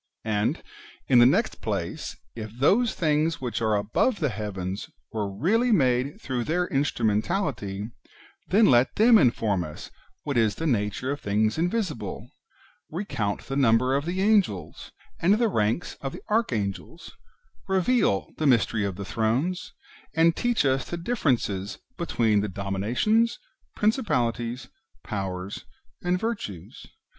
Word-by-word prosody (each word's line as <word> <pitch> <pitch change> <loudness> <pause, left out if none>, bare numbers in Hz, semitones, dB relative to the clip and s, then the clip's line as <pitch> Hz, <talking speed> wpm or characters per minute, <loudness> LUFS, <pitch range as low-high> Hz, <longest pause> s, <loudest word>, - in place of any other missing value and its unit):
And, 105 -1 0 0.4
in 125 - +6
the 120 - +8
next 200 - +1
place, 100 -6 -3 0.2
if 110 -2 -6
those 215 - +3
things 155 0 +1
which 120 -4 -3
are 110 -1 +2
above 110 - +1
the 150 -5 +1
heavens 100 -3 -5 0.2
were 105 -3 -2
reallv 205 - +1
made 130 -1 +2
throuo;h 125 - -3
their 180 +3 +1
instru 135 -4 0
mentality, 105 - -1 0.6
then 210 +5 +5
let 125 -4 +4
them 225 +1 +6
inform 110 - +2
us 75 -2 -9 0.3
what 140 -4 -2
is 110 -3 +2
the 165 - -4
nature 115 -1 0
of 145 - -3
things 110 +6 +1
invisible, 170 - -2 0.6
recount 150 - -3
the 135 - -6
number 130 0 +3
of 140 +2 -1
the 180 +2 -2
Angels, 190 - +1 0.3
and 190 +5 +4
the 230 +1 +2
ranks 115 - 0
of 135 -1 -4
the - - -9
Archangels, 115 - -2 0.6
reveal 190 - +1
the 155 - +1
mysteries 115 -4 +2
of 95 - -5
the 100 +1 -6
Thrones, 145 - -1 0.4
and 165 +1 +4
teach 240 -9 +1
us 135 -1 +2
the 175 - -3
differences 125 - -1 0.2
between 115 - +1
the 105 - -2
Dominations, 105 - 0 0.4
Prin 210 +1 +3
cipalities, 125 - -2 0.4
Powers, 95 -2 -5 0.4
and 180 +1 0
Virtues. 200 - -5
125 Hz, 140 wpm, -26 LUFS, -, 0.6 s, the